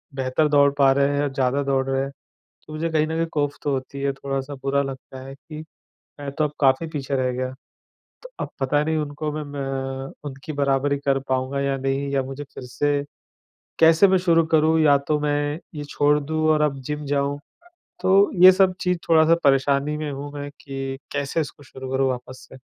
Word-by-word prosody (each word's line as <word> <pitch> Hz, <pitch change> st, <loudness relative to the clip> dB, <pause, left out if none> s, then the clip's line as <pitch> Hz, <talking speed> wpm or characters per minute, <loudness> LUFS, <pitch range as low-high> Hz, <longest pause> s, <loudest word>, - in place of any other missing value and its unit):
बेहतर 130 Hz, +3 st, +1 dB
दौड़ 140 Hz, -1 st, +5 dB
पा 135 Hz, -1 st, +5 dB
रहे 140 Hz, +1 st, +2 dB
हैं 145 Hz, -, +1 dB
और 140 Hz, -, -1 dB
ज़्यादा 135 Hz, +1 st, +1 dB
दौड़ 135 Hz, -1 st, +1 dB
रहे 135 Hz, 0 st, +1 dB
हैं, 135 Hz, -, -4 dB, 0.6 s
तो 155 Hz, -, -9 dB
मुझे 165 Hz, +2 st, -2 dB
कहीं 155 Hz, -1 st, +2 dB
न 160 Hz, -, -3 dB
कहीं 165 Hz, -, +1 dB
कॉफ 145 Hz, -1 st, 0 dB
तो 145 Hz, -, 0 dB
होती 135 Hz, +1 st, -4 dB
है 140 Hz, 0 st, +1 dB
थोड़ा-सा 135 Hz, +1 st, -4 dB
बुरा 140 Hz, +1 st, +1 dB
लगता 130 Hz, -1 st, -8 dB
है 135 Hz, -, -8 dB
कि 155 Hz, +2 st, -11 dB, 0.6 s
मैं 140 Hz, -1 st, -4 dB
तो 155 Hz, +2 st, 0 dB
अब 150 Hz, -, -2 dB
काफ़ी 135 Hz, +4 st, +3 dB
पीछे 140 Hz, -3 st, -4 dB
रह 130 Hz, -1 st, 0 dB
गया, 130 Hz, +1 st, -3 dB, 0.7 s
तो -, -, -11 dB
अब -, -, -3 dB
पता 145 Hz, +2 st, +1 dB
नहीं 160 Hz, 0 st, 0 dB
उनको 150 Hz, 0 st, -3 dB
मैं 155 Hz, 0 st, -4 dB
मैं 145 Hz, -1 st, -6 dB, 0.5 s
अ, -, -, -10 dB, 0.2 s
उनकी 135 Hz, +3 st, -7 dB
बराबरी 140 Hz, 0 st, +1 dB
कर 140 Hz, -1 st, +1 dB
पाऊँगा 130 Hz, +1 st, -1 dB
या 140 Hz, 0 st, 0 dB
नहीं 135 Hz, +1 st, -1 dB
या 135 Hz, -1 st, +1 dB
मुझे 135 Hz, +2 st, -6 dB
फिर -, -, -8 dB
से 145 Hz, +3 st, -1 dB, 0.8 s
कैसे 165 Hz, +4 st, +6 dB
मैं 190 Hz, 0 st, +4 dB
शुरू 165 Hz, -2 st, +3 dB
करूँ? 160 Hz, +1 st, +4 dB
या 145 Hz, -2 st, +6 dB
तो 150 Hz, +2 st, -1 dB
मैं 145 Hz, +1 st, -1 dB, 0.2 s
ये 145 Hz, -1 st, -5 dB
छोड़ 145 Hz, +1 st, +2 dB
दूँ 155 Hz, +2 st, -1 dB
और 155 Hz, -1 st, +3 dB
अब 140 Hz, -3 st, 0 dB
जिम 150 Hz, +2 st, -4 dB
जाऊँ? 140 Hz, 0 st, 0 dB, 0.6 s
तो 190 Hz, +2 st, +4 dB
ये 185 Hz, 0 st, +11 dB
सब 185 Hz, -1 st, +3 dB
चीज़ 180 Hz, -1 st, 0 dB
थोड़ा-सा 160 Hz, 0 st, +5 dB
परेशानी 140 Hz, +2 st, +2 dB
में 150 Hz, -1 st, -4 dB
हूँ 140 Hz, +1 st, -6 dB
मैं 145 Hz, 0 st, -6 dB
कि 135 Hz, -1 st, -5 dB, 0.2 s
कैसे 145 Hz, +3 st, -1 dB
इसको 145 Hz, -1 st, -6 dB
शुरू 130 Hz, -1 st, -9 dB
करूँ 135 Hz, 0 st, +2 dB
वापस 130 Hz, +1 st, -7 dB
से। -, -, -11 dB
145 Hz, 210 wpm, -23 LUFS, 135-155 Hz, 0.8 s, ये